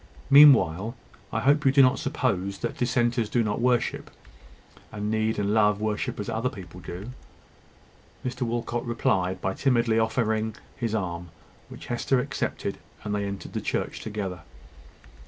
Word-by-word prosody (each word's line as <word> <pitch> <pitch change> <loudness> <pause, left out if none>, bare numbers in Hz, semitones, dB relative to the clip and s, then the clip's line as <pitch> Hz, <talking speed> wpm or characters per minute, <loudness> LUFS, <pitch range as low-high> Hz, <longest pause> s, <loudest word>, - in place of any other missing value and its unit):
Meanwhile, 120 - +6 0.4
I 115 - -1
hope 145 +5 +3
you 135 - +5
do 135 0 +6
not 130 +1 +3
suppose 100 - -1
that - - -4
dissenters 120 -2 +1
do 120 - +2
not 105 +1 -2
worship 125 -1 0 0.8
and 105 0 -3
need 110 0 0
and 100 0 0
love 105 -2 +3
worship 105 0 -2
as 105 - -4
other 115 +2 -1
people 90 -4 -10
do!" 95 +6 -7 1.1
Mr 125 0 -4
Walcot 120 0 -2
replied 95 -6 0
by 95 - -1
timidly 115 -3 +2
offering 110 -1 0 0.2
his 115 -4 -2
arm, 90 -4 -3 0.4
which - - -10
Hester 125 +2 0
accepted, - - -3 0.2
and 105 - -3
they 100 -1 -1
entered 100 -1 -6
the - - -2
church - - -2
together. 100 -4 -5
110 Hz, 150 wpm, -26 LUFS, 100-120 Hz, 1.1 s, Meanwhile